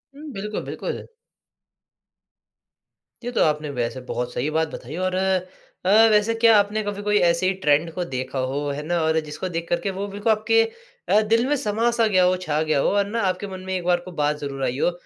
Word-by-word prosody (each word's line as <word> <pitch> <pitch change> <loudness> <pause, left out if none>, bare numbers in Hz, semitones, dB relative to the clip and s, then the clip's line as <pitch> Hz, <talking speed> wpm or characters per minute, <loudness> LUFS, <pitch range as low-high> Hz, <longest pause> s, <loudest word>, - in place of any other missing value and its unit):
हुँ। 300 0 -9
बिल्कुल, 210 +1 -4
बिल्कुल। - - -5 2.2
ये 245 - -3
तो - - 0
आपने 150 -1 0
वैसे 120 +2 -2
बहुत 125 0 -3
सही 135 +5 -1
बात 160 +1 +1
बताई 135 +6 -7
और 185 0 0 0.7
अ, 185 - +2 0.2
वैसे 210 +2 +3
क्या 225 -1 +6
आपने 210 +2 0
कभी 205 0 -4
कोई 210 0 +2
ऐसे 170 +2 +1
ही 190 - +2
ट्रेंड 150 +3 +3
को 180 - -2
देखा 130 -1 -4
हो 140 - -2
है 140 +1 -4
ना 175 +2 0
और 160 0 +2
जिसको 155 +4 -5
देख 170 -1 -4
कर 175 - +1
के 200 - -2
वो 195 +2 -4
बिल्कुल 205 +3 0
आपके 220 +1 +3 0.5
अ, 210 - +5
दिल 230 +3 +2
में 295 - +2
समा 225 -2 0
सा 230 -1 +2
गया 185 -3 +3
हो, 180 +1 +4
छा 155 -4 -1
गया 155 -2 +1
हो - - +2
और 200 - +3
ना 230 +3 -2
आपके 185 +2 -3
मन 190 -1 -7
में 190 - -3
एक 180 - -3
बार 175 0 +3
कोई 180 +1 -11
बात 150 0 +1
ज़रूर 140 -2 -5
आई 125 - -2
हो - - +2
185 Hz, 225 wpm, -23 LUFS, 150-210 Hz, 2.2 s, क्या